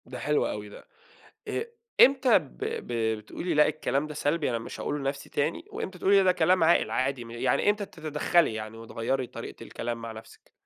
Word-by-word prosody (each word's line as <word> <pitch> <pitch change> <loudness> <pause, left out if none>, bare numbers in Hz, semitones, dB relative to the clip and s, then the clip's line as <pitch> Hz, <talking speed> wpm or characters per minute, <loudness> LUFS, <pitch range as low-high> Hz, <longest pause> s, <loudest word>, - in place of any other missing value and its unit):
ده 125 0 -8
حلو 150 0 +1
أوي 105 0 -5
ده، - - -13 0.6
إ - - -1 0.4
إمتى 260 -3 +7
ب 150 -7 -14
ب 110 -2 -1
بتقولي 160 +11 -4
لأ 150 0 +5
الكلام 145 -1 -1
ده 150 - -7
سلبي 145 0 0
أنا 115 - 0
مش 115 - -8
هاقوله 145 - -2
لنفسي 140 0 -3
تاني، 150 +3 -1
وإمتى 185 -1 -5
تقولي 195 +2 +5
ده 185 - +5
كلام 180 0 +3
عاقل 160 -9 +4
عادي 130 +1 -1
م 115 - -11
يعني 120 - +2
إمتى 205 -1 -2
تتدخلي 155 -3 +1
يعني 110 0 -6
وتغيّري 115 +3 -2
طريقة - - -9
الكلام 115 0 -5
مع 115 -1 -5
نفسِك؟ 110 0 -14
140 Hz, 190 wpm, -28 LUFS, 115-170 Hz, 0.6 s, إمتى